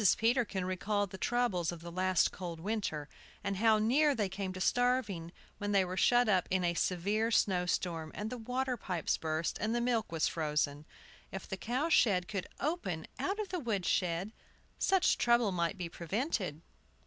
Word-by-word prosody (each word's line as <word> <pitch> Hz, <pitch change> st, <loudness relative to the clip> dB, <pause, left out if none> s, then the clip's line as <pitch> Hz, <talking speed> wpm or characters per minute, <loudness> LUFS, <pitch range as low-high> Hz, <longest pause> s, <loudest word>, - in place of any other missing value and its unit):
Peterkin 225 Hz, -5 st, +1 dB
recalled 200 Hz, +1 st, -1 dB
the 190 Hz, -, -7 dB
troubles 210 Hz, -9 st, +1 dB
of 170 Hz, -2 st, -8 dB
the 170 Hz, 0 st, -8 dB
last 185 Hz, 0 st, +2 dB
cold 175 Hz, -3 st, -6 dB
winter, 180 Hz, -6 st, -2 dB, 0.4 s
and 200 Hz, -1 st, -2 dB
how 220 Hz, +1 st, +5 dB
near 275 Hz, +7 st, +3 dB
they 210 Hz, -4 st, 0 dB
came 190 Hz, 0 st, -4 dB
to 185 Hz, -, -7 dB
starving, 220 Hz, -7 st, +1 dB, 0.3 s
when 205 Hz, 0 st, -2 dB
they 195 Hz, -2 st, +4 dB
were 180 Hz, +1 st, -4 dB
shut 245 Hz, +5 st, +4 dB
up 190 Hz, -4 st, +3 dB
in 185 Hz, -1 st, +1 dB
a 170 Hz, -1 st, +2 dB
severe 200 Hz, +6 st, 0 dB
snow 185 Hz, -5 st, +2 dB
storm, 165 Hz, -3 st, -1 dB
and 210 Hz, +1 st, -4 dB
the 250 Hz, -, -4 dB
water 250 Hz, +3 st, -1 dB
pipes 180 Hz, -7 st, -1 dB
burst, 160 Hz, +1 st, -2 dB
and 220 Hz, +3 st, 0 dB
the -, -, +2 dB
milk 235 Hz, -4 st, 0 dB
was 160 Hz, -2 st, +1 dB
frozen. 150 Hz, -1 st, -1 dB, 0.4 s
If 195 Hz, -, -6 dB
the -, -, -3 dB
cow 250 Hz, -, -1 dB
shed 195 Hz, -, +4 dB
could 200 Hz, -3 st, -3 dB
open 235 Hz, -, -2 dB
out 385 Hz, +10 st, -1 dB
of 420 Hz, -3 st, -3 dB
the 360 Hz, -, -2 dB
wood 215 Hz, -, -2 dB
shed, 180 Hz, +2 st, 0 dB, 0.5 s
such 385 Hz, -2 st, +3 dB
trouble 235 Hz, -3 st, +3 dB
might 170 Hz, +1 st, -1 dB
be 180 Hz, -2 st, -3 dB
prevented. 180 Hz, -, -3 dB
195 Hz, 185 wpm, -33 LUFS, 175-235 Hz, 0.5 s, how